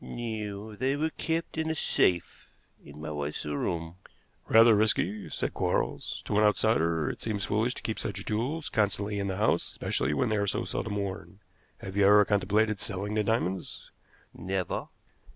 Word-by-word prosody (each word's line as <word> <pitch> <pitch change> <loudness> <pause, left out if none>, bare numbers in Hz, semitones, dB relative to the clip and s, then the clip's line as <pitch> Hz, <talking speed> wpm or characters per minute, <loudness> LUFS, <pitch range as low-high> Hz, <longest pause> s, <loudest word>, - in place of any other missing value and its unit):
"No; 110 -3 -5
they 130 +5 0
were 160 +2 0
kept 165 0 -2
in 160 0 0
a 160 - 0
safe 90 - +1 0.3
in 70 +1 -12
my 80 0 -5
wife's 75 0 -4
room." 80 +3 -3 0.5
"Rather 115 +1 +7
risky," 105 -1 +1
said - - -2
Quarles. - - -1
"To 105 - +1
an - - +4
outsider 85 -7 +2
it - - -4
seems 105 -3 -2
foolish 110 +4 0
to - - -9
keep 110 - -3
such 95 -1 -4
jewels 130 +9 -1
constantly 105 -1 0
in 100 - -1
the 95 -1 -2
house, 105 - +2
especially 70 +3 -1
when 125 - +1
they 110 - +1
are 100 0 0
so - - 0
seldom 105 - -3
worn. 95 -3 -4 0.4
Have 95 0 -7
you 100 -1 +4
ever 105 0 +7
contemplated 105 +1 +2
selling 100 0 -4
the 105 0 +1
diamonds?" 100 -4 -2 0.4
"Never." 95 -1 -3
105 Hz, 170 wpm, -29 LUFS, 95-110 Hz, 0.5 s, Rather